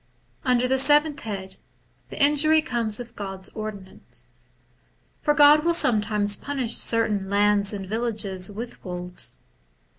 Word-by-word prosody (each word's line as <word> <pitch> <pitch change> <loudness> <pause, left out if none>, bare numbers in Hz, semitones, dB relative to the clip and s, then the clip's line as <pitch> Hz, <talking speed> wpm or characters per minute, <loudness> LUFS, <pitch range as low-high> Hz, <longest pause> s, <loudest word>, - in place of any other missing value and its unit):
Under 250 -2 +2
the 265 +1 +1
seventh 295 +1 +3
head, 195 -5 -6 0.5
the - - -9
injury 300 +2 +4
comes 230 -6 -1
of 240 -1 -9
God's 195 -2 -6
ordinance. 210 -3 -5 0.9
For 295 -1 +1
God 295 0 +7
wiU 340 +2 +3
sometimes 210 -7 +2
punish 265 -5 -3
certain 210 -4 0
lands 205 0 +2
and 200 -2 -6
villages 210 -4 -1
with 230 +4 -8
wolves. 180 0 -3
220 Hz, 125 wpm, -24 LUFS, 200-275 Hz, 0.9 s, God